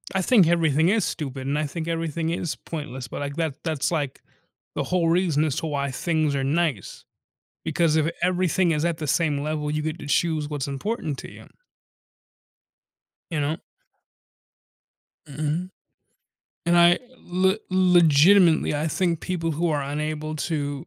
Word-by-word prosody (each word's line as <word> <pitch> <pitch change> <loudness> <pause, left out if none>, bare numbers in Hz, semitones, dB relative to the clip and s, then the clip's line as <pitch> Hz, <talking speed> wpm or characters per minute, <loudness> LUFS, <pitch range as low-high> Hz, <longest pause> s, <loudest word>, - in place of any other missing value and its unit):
I 190 - +2
think 195 -3 +5
everything 160 -1 +3
is 215 +2 +2
stupid 135 -4 -4
and 140 +2 0
I 150 - 0
think 165 +2 -5
everything 165 -1 -2
is 170 -1 -2
pointless, 130 -6 -7
but 115 - -6
like 140 0 -4
that 160 -4 -3
that's 155 -3 -1
like 145 -5 -2 0.5
the - - -1
whole 175 -2 +1
reason 165 -3 +2
as 145 -4 -1
to 160 - -2
why 140 -2 -2
things 155 +1 0
are 135 - -1
nice. 145 - -1 0.6
Because 160 0 +1
if 160 +1 +2
everything 180 -1 +2
is 150 0 0
at 170 -2 0
the 155 - -4
same 145 0 +1
level, 150 0 -2
you 150 0 -1
get 155 +2 -3
to 145 - -8
choose 155 0 0
what's 145 -3 -3
important 150 - -3
to - - -10
you - - -13 1.9
you 155 - -1
know? 150 +3 -1 1.7
Mhm. 155 +5 -2 1.0
And 175 0 +4
I 175 0 +6 0.2
le 190 +3 +1
legitimately, 175 -2 +5
I 150 +2 -1
think 170 -1 0
people 165 -3 -2
who 165 +3 0
are 145 -2 0
unable 155 +2 -3
to 145 -2 -3
155 Hz, 160 wpm, -24 LUFS, 145-170 Hz, 1.9 s, I